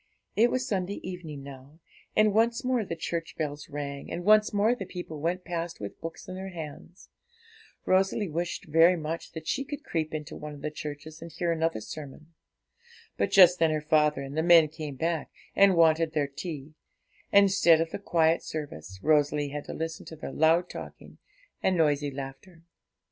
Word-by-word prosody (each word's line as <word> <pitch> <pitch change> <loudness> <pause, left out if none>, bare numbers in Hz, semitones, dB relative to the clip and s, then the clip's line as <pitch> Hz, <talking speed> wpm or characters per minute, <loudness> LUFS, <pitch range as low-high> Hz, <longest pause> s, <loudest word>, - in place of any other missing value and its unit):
It 235 +3 +5
was 255 +1 -1
Sunday 195 -1 -2
evening 160 -6 -7
now, 140 +3 -12 0.4
and 215 -1 +4
once 230 +2 +2
more 250 -3 +1
the 170 - -5
church 165 0 -4
bells 150 -2 -4
rang, 140 -1 -6
and 175 +2 -4
once 215 0 +5
more 210 +3 +3
the 195 -7 -6
people 175 -4 -7
went 180 +3 -1
past 170 0 -4
with 100 -1 -8
books 165 0 -7
in 185 - -6
their 190 +1 -6
hands. 165 +1 -9 0.8
Rosalie 190 +2 +2
wished 170 +2 -3
very 165 +3 +5
much 165 0 -5
that 160 -1 -7
she 275 - 0
could 290 +2 -7
creep 160 - -2
into 150 -2 -5
one 150 0 -7
of 140 - -13
the 150 - -2
churches 150 +1 -8
and 165 0 -8
hear 170 +2 -1
another 165 -7 0
sermon. 155 +6 -9 0.8
But - - 0
just 180 -2 +7
then 165 -1 +4
her 155 0 0
father 150 -2 +2
and 135 +1 -7
the 160 - +1
men 165 -2 +6
came 150 -2 -7
back 165 +1 -2 0.3
and 195 -2 +6
wanted 165 -1 +4
their 150 -2 +1
tea; 150 0 -7 0.6
and, 200 0 +7
instead 185 -4 +5
of 165 0 -1
the - - -4
quiet 165 -4 +2
service, 95 - -7
Rosalie 150 -1 +2
had 145 +1 -6
to - - -6
listen 160 0 -5
to 160 - -8
their 155 - -7
loud 165 +3 +3
talking - - -10 0.4
and 185 -1 +2
noisy 145 -2 +2
laughter. 140 +5 -9
165 Hz, 185 wpm, -28 LUFS, 150-180 Hz, 0.8 s, just